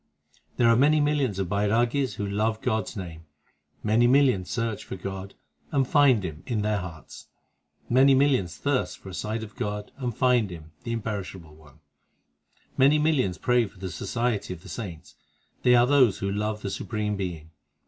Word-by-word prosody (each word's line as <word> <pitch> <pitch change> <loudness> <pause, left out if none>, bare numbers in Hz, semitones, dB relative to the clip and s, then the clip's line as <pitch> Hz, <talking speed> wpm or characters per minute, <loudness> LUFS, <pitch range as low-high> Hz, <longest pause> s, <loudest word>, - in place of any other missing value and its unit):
6 - - -31 0.2
There 120 - +4
are 115 - +6
many 150 +5 +4
millions 145 -8 +1
of 95 -2 -1
Bairagis 115 +5 +1
Who 105 - -3
love 110 +2 0
God 110 -5 0
s - - -9
name; 85 -5 -8 0.6
Many 110 +3 +3
millions 130 -8 +3
search 115 -3 -2
for - - -7
God, 95 +1 -7 0.4
And 135 -3 +1
find 135 -8 +4
Him 80 -3 -6
in 110 -5 -1
their 105 -1 0
hearts; 85 -4 -10 0.6
Many 135 +2 +5
millions 130 - +2
thirst 140 -3 -1
for 95 - -11
a - - -9
sight 110 +4 -3
of 105 - -10
God, 105 0 -4
And 125 -4 -4
find 125 -5 +3
Him, 80 -3 -10
the 115 - -3
Imperishable 100 -7 -5
One; 75 -1 -19 1.0
Many 140 +3 +6
millions 150 - +1
pray 125 -2 +2
for 100 - -18
the 95 0 -6
society 115 -2 -2
of 85 - -17
the - - -11
saints 90 -7 -7 0.5
They 125 0 +5
are 120 0 +6
those 130 -7 +4
who 100 0 -2
love 105 +1 -2
the 100 - -3
Supreme 105 0 -3
Being. 85 -5 -5
110 Hz, 180 wpm, -26 LUFS, 95-125 Hz, 1.0 s, are